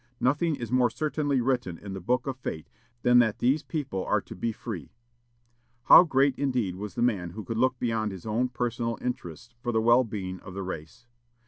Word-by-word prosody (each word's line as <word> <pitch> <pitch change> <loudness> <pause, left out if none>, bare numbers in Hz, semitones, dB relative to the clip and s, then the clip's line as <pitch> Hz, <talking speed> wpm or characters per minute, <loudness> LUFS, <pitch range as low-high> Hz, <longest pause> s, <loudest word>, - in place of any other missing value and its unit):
Nothing 150 +5 +2
is 120 -4 -6
more 125 -1 +4
certainly 145 -1 0
written 120 -9 -1
in 100 +1 -8
the 95 - -5
book 125 +7 0
of 135 -2 -3
fate 80 -10 -5 0.4
than 125 0 +6
that 110 -3 +2
these 135 +5 +2
people 140 - -3
are - - +1
to - - -10
be 115 - -1
free." 105 - -7 0.9
How 180 - +9
great 140 -3 +3
indeed 125 -10 0
was 100 +2 -7
the 120 - 0
man 100 -8 +1
who 105 +5 -7
could 115 +1 -3
look 130 +1 +2
beyond 115 -3 -1
his 95 -3 -9
own 115 +4 0
personal 120 -1 -2
interests 120 - -5
for 120 - -1
the 110 - +2
well 120 +3 +5
being 95 -5 -5
of 95 - -11
the 95 - -3
race! 80 +4 -7
120 Hz, 205 wpm, -27 LUFS, 100-130 Hz, 0.9 s, How